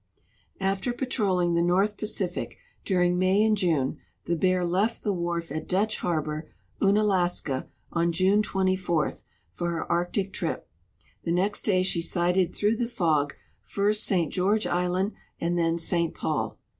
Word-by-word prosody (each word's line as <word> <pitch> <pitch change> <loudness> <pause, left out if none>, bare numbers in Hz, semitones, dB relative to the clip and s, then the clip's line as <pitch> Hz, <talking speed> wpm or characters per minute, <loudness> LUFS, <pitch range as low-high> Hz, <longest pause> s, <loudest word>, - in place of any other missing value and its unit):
After 195 +5 0
}»atrolling 195 -9 0
the 170 - +3
North 190 +4 +2
Pacific 195 -4 -3 0.3
during 180 -2 +2
IMay 190 +3 +4
and 220 -1 +4
June 160 -9 0 0.3
the 170 - 0
Bear 185 +1 +2
left 195 +7 0
the 205 - +1
wharf 170 -3 -2
at 155 +1 -4
Dutch 210 +4 +1
harbor, 155 -2 -2 0.3
Unalaska, 190 -9 +2 0.3
on 170 0 +2
June 190 +5 +3
24 185 -5 0 0.4
for 175 -1 -3
her 170 -1 -3
Arctic 175 +3 0
trip. - - -3 0.6
The 170 - -1
next 190 +4 0
day 185 -3 +3
she 185 -2 +1
sighted 175 +1 +1
through 210 +2 +1
the 240 - 0
fog 155 -10 +1 0.3
first 205 - 0
St. 175 -6 0
George 205 +4 +2
island 180 +3 0 0.3
and 170 +1 0
then 165 -1 +1
St. 170 0 0
Paul. - - -2
180 Hz, 145 wpm, -27 LUFS, 170-200 Hz, 0.6 s, IMay